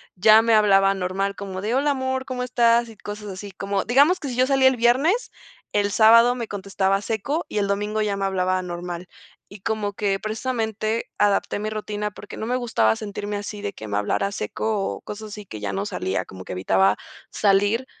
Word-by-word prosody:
ya 215 +4 +7
me 230 0 +3
hablaba 195 -2 +5
normal 195 +1 -2
como 195 -2 -6
de, 220 +4 -1
hola 285 +2 +2
amor, 260 -1 -1
¿cómo 255 -1 -3
estás?, 235 -1 +3
y 225 - -12
cosas 210 0 -7
así, 195 +1 -7
como 195 +1 -2
digamos 285 +9 +4
que 285 - -4
si 245 - -4
yo 255 - +4
salía 270 -1 +5
el 260 - -2
viernes, 270 - +2 0.4
el 205 0 +1
sábado 230 +3 +6
me 235 -2 -4
contestaba 195 -1 -1
seco 230 - -2
y - - -4
el 200 -1 +1
domingo 210 +2 -1
ya 210 -2 0
me 195 - -3
hablaba 185 -1 0
normal. 175 0 -6 0.4
Y 200 - -12
como 215 -1 -1
que, 200 -1 0
precisamente, 220 0 -2
adapté 205 0 +1
mi 215 +1 -2
rutina 210 -1 -3
porque 205 0 -10
no - - -4
me 245 +2 0
gustaba 165 - +2
sentirme 205 0 -5
así 205 0 -6
de 205 -1 -4
que 110 -10 -9
me 100 - -1
hablara 195 - 0
seco 220 +1 -2 0.2
o - - -15
cosas 215 +1 -8
así 210 0 -8
que 110 - -8
ya 100 -1 -3
no 100 +1 -2
salía, 95 -2 -2
como 95 0 -11
que - - -6
evitaba 95 +2 +2 0.4
salir 205 +4 +2
210 Hz, 205 wpm, -23 LUFS, 195-230 Hz, 0.4 s, ya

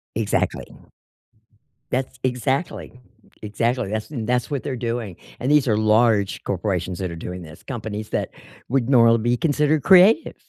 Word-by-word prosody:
Exactly. 110 -1 -1 1.3
That's 130 0 -3
exactly. 130 +1 -2 0.4
Exactly. 115 +2 -1
That's 110 +4 -4
and 120 -8 -5
that's 125 +2 0
what 140 -3 -2
they're 135 - -3
doing. 115 -5 -4 0.2
And 130 +3 -1
these 150 -3 +4
are 105 - +2
large 110 -2 +2
corporations 90 -2 -2
that 90 -2 -3
are - - -6
doing 90 +2 -7
this, 80 +1 -13
companies 110 -4 -6
that - - -2 0.4
would 130 -1 0
normally 115 -3 +5
be 120 +2 0
considered 150 -1 +1
creative. 190 - +5
115 Hz, 150 wpm, -22 LUFS, 105-130 Hz, 1.3 s, normally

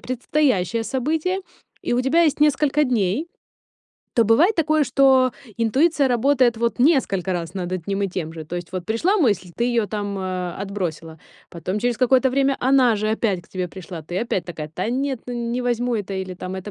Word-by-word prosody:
предстоящее 245 - 0
событие, 310 +10 -1 0.4
и - - -2
у 245 - +2
тебя 285 +7 +3
есть 300 -2 +1
несколько 300 0 +3
дней, 240 - 0 0.9
то 230 - +5
бывает 300 - +4
такое, 310 -2 +2
что 265 -2 +4 0.2
интуиция 275 +6 +2
работает 250 -1 +2
вот 235 +2 -1
несколько 240 - +2
раз 170 -2 -4
над 185 -2 -4
одним 195 +3 -2
и 195 - 0
тем 165 -3 -4
же. 160 -1 -8
То 165 - -7
есть 175 -1 -5
вот 180 -1 -5
пришла 335 - +1
мысль, 205 - +1
ты 235 - 0
её 235 -4 +1
там, 205 0 -3
а, 185 -2 -4
отбросила, 175 -5 -5 0.3
потом 185 +4 -4
через 240 -1 0
какое-то 260 +1 +3
время 275 0 +2
она 255 -2 +4
же 215 +1 -1
опять 205 -5 0
к - - -24
тебе 185 -1 -3
пришла, 175 -2 -9
ты 175 +4 -6
опять 230 -6 -2
такая: 160 -3 -6
"Та 185 +6 -3
нет, 265 +1 -1
ну, 250 - -5 0.2
не 245 +1 -1
возьму 245 -1 0
это". 200 -1 -4
Или 190 -1 -4
там: 185 +1 -6
"Это 190 +2 -6
230 Hz, 195 wpm, -22 LUFS, 185-265 Hz, 0.9 s, то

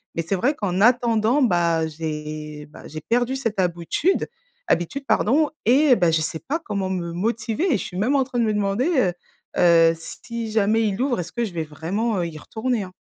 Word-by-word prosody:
Mais 165 - 0
c'est 175 +4 -1
vrai 255 +11 +1
qu'en 190 -7 -2
attendant 235 +2 +3
bah, 170 -8 +2
heu, - - -2
j'ai 150 -1 -6
bah, 150 - -13
j'ai 155 +1 -7
perdu 245 - 0
cette 225 -6 -3
habitude-, 175 - 0 0.4
habitude 175 +12 -1
pardon 290 +7 +3 0.2
et 265 +3 +5
bah, 175 -6 +2
je 160 -1 +2
sais 160 +1 -3
pas 315 +4 0
comment 200 -6 -2
me 170 -2 -3
motiver 225 - -1
et - - +3
je - - -4
suis 180 - -7
même 220 +8 +1
en 270 - +3
train 255 -1 -6
de - - +3
me 215 - +1
demander, 205 +6 0
heu 190 -10 +2 0.4
heu, 165 -2 +5
si 230 +6 -6
jamais 220 +1 +2
il 200 +3 -2
ouvre, 260 -6 0
est-ce 170 -1 -6
que 240 - -1
je 200 - -7
vais 165 -2 -2
vraiment, 185 +8 -2
heu, 175 - 0
y 155 - -8
retourner 225 +6 -2
hein. 185 - -10
205 Hz, 215 wpm, -23 LUFS, 170-240 Hz, 0.4 s, et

